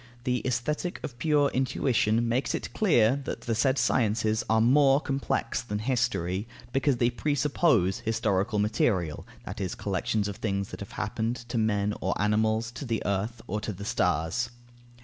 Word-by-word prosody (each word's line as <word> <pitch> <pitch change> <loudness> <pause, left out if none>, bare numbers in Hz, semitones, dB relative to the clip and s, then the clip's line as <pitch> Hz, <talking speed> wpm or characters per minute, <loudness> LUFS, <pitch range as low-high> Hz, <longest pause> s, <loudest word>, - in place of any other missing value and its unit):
The 125 0 0
Aesthetic 150 +8 -2
of 120 -3 -7
pure 145 0 +3
intuition 120 -3 +1
makes 120 +4 0
it - - -5
clear 140 - +3
that - - -4
the 115 - -2
said 130 +4 +2
sciences 110 -3 +1
are 110 0 +4
more 135 +4 +5
complex 140 -2 -1
than 105 -3 -4
History, 110 -5 -1 0.3
because 135 0 +2
they 120 0 +2
presuppose 140 - +1
historical 110 -1 0
material, 100 -6 0 0.2
that 100 +3 -6
is, 95 -2 -2
collections 100 +1 -1
of 100 - -5
things 100 -2 -2
that - - -8
have - - -8
happened 115 +2 -3
(to 120 -1 -1
men 105 -2 +1
or - - -1
animals, 110 +2 +1
to 140 - -7
the 115 -3 -2
earth 105 +4 -2
or 105 +3 -3
to 105 - -3
the 100 +1 -8
stars). 90 0 0
115 Hz, 165 wpm, -28 LUFS, 105-125 Hz, 0.3 s, more